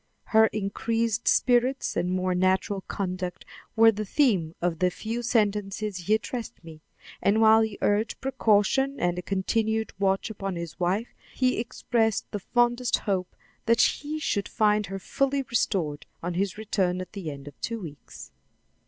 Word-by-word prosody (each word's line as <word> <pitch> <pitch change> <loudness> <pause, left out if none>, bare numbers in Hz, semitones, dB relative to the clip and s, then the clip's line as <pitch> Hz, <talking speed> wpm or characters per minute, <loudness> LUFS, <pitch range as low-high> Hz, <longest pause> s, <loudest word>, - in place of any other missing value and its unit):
Her 220 0 +5
increased 225 +2 -1
spirits 250 +2 +2
and 180 - 0
more 185 0 0
natural 190 +2 +1
conduct 185 -2 -4 0.3
were 225 0 +7
the 215 0 -4
theme 195 - +1
of 170 -2 -1
the 180 - +3
few 225 +6 -4
sentences 210 -3 0
he 190 +4 +2
addressed 230 -3 -5
me, 160 -2 -12 0.4
and 205 +2 +3
while 220 0 +6
he 220 -2 -2
urged 210 +2 +1
precaution 265 +1 +2
and 175 0 0
a - - -3
continued 220 +4 -1
watch 195 +2 +1
upon 195 -3 -4
his 170 -2 -6
wife, 190 +6 -1 0.2
he 255 -2 +1
expressed 230 -2 -1
the 205 - -3
fondest 240 +3 +1
hope 185 -3 -2 0.3
that 230 +1 +4
he 300 +2 +1
should 205 -9 -1
find 210 -1 +2
her 195 +1 -5
fully 275 +7 0
restored 180 - -1 0.2
on 175 +1 -2
his 195 +3 -1
return 190 -4 0
at 185 +2 -7
the 190 -6 -5
end 140 -1 -9
of 145 - -12
two 230 -1 -3
weeks. 150 -7 -10
210 Hz, 160 wpm, -26 LUFS, 185-230 Hz, 0.4 s, were